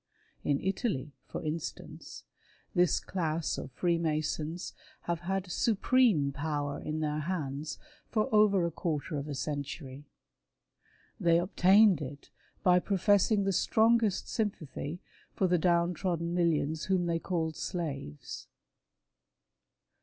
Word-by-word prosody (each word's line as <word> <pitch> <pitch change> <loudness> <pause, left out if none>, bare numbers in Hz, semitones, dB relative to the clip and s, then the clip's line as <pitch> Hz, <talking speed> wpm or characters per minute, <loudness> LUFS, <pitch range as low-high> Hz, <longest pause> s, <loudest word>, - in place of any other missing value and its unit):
In 140 -1 +1
Italy, 190 - -1 0.2
for - - -6
instance, 155 +1 -6 0.5
this 175 -3 +3
class 165 -3 -2
of - - -7
Freemasons 160 0 -1 0.3
have 170 -1 -2
had 185 +1 -3
supreme 215 - +3
power 145 0 -2
in 155 +1 -3
their 150 0 -1
hands 150 -3 -3 0.3
for 215 -2 +1
over 205 -4 +5
a 170 - -1
quarter 155 -1 -2
of 140 - -6
a 145 - -4
century. 140 -1 -5 1.2
Thay 170 -1 +5
obtained 190 +1 +5
it 140 0 -8 0.3
by 180 -2 +6
professing 200 +2 +3
the 195 0 +1
strongest 220 +1 +3
sympathy 175 - -3 0.3
for 190 - +2
the 180 -1 +3
down 170 +1 +3
trodden 170 -1 -2
millions 160 -3 +1
whom 185 -2 +1
they 170 -1 0
called 165 -3 -2
slaves. 145 - -5
170 Hz, 115 wpm, -31 LUFS, 150-190 Hz, 1.2 s, by